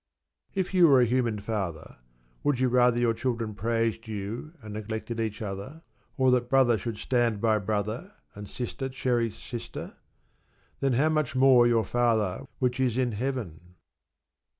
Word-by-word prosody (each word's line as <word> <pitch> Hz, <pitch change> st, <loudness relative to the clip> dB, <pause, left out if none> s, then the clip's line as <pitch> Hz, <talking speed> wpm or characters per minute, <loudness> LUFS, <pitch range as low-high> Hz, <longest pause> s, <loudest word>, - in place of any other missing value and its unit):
If 190 Hz, -1 st, -1 dB
you 180 Hz, -2 st, +6 dB
were 135 Hz, -4 st, +6 dB
a 125 Hz, -, +5 dB
human 120 Hz, -2 st, 0 dB
father, 100 Hz, -7 st, -4 dB, 0.4 s
would 145 Hz, -4 st, +1 dB
you 130 Hz, -1 st, +2 dB
rather 125 Hz, -1 st, +4 dB
your 120 Hz, -1 st, +2 dB
children 115 Hz, -2 st, -2 dB
praised 115 Hz, +2 st, -1 dB
you 110 Hz, -, -5 dB
and 110 Hz, -4 st, -9 dB
neglected 110 Hz, +2 st, -5 dB
each 110 Hz, -1 st, -3 dB
other, 105 Hz, +11 st, -7 dB, 0.3 s
or 130 Hz, -1 st, +4 dB
that 125 Hz, -1 st, +1 dB
brother 130 Hz, -3 st, +4 dB
should 110 Hz, +2 st, -4 dB
stand 120 Hz, -3 st, +1 dB
by 110 Hz, 0 st, +2 dB
brother 110 Hz, -, -3 dB, 0.2 s
and 100 Hz, 0 st, -9 dB
sister 130 Hz, +2 st, -4 dB
cherish 120 Hz, -3 st, -1 dB
sister? 120 Hz, -2 st, -7 dB, 0.8 s
Then 135 Hz, -2 st, +1 dB
"how 145 Hz, +6 st, +3 dB
much 155 Hz, -3 st, 0 dB
more 130 Hz, -2 st, +6 dB
your 115 Hz, -3 st, +2 dB
Father 110 Hz, -5 st, 0 dB
which 125 Hz, 0 st, 0 dB
is 125 Hz, -3 st, +1 dB
in 125 Hz, -2 st, +1 dB
Heaven?" 100 Hz, -, -5 dB
120 Hz, 155 wpm, -27 LUFS, 110-130 Hz, 0.8 s, you